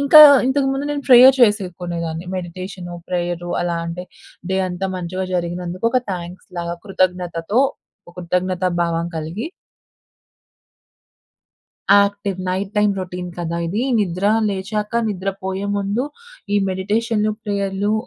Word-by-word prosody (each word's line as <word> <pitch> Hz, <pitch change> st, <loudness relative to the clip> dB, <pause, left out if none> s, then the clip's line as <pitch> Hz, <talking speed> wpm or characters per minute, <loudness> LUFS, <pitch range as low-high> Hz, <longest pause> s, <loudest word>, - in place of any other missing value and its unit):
ఇంకా 280 Hz, +2 st, +7 dB, 0.3 s
ఇంతకుముందు 270 Hz, +1 st, +1 dB
నేను 290 Hz, -1 st, -2 dB
ప్రేయర్ 255 Hz, +1 st, +9 dB
చేసేకునేదాన్ని. 175 Hz, -5 st, 0 dB
మెడిటేషను 180 Hz, 0 st, -6 dB, 0.2 s
ప్రేయరు 175 Hz, -1 st, -2 dB
అలా 175 Hz, -1 st, -1 dB
అంటే, 170 Hz, +2 st, -5 dB, 0.5 s
డే 190 Hz, -, +1 dB
అంతా 180 Hz, +2 st, -3 dB
మంచిగా 185 Hz, +1 st, -3 dB
జరిగినందుకు 175 Hz, +3 st, -2 dB
ఒక 255 Hz, -, +3 dB
థాంక్స్‌ 175 Hz, 0 st, -7 dB
లాగా 170 Hz, 0 st, -3 dB
కృతజ్ఞతతో 180 Hz, +2 st, 0 dB, 0.5 s
ఓ -, -, -11 dB
కృతజ్ఞత 180 Hz, +1 st, -1 dB, 0.2 s
భావం 170 Hz, 0 st, -1 dB
కలిగి 165 Hz, -, -4 dB, 2.4 s
యాక్టివ్ 200 Hz, -1 st, +3 dB
నైట్ 190 Hz, +2 st, -2 dB
టైమ్ 210 Hz, -1 st, +4 dB
రొటీన్ 180 Hz, -1 st, -5 dB
కదా! 170 Hz, -1 st, -2 dB
ఇది 200 Hz, +7 st, -1 dB, 0.2 s
నిద్ర 185 Hz, -1 st, 0 dB, 0.2 s
లేచాక 210 Hz, +2 st, -3 dB, 0.2 s
నిద్ర 195 Hz, -2 st, -3 dB, 0.2 s
పోయే 190 Hz, +1 st, -2 dB
ముందు 200 Hz, +6 st, -1 dB, 0.5 s
ఈ -, -, +5 dB
మెడిటేషను 210 Hz, +3 st, 0 dB
ప్రేయరులు 200 Hz, 0 st, -1 dB
185 Hz, 115 wpm, -20 LUFS, 175-205 Hz, 2.4 s, ప్రేయర్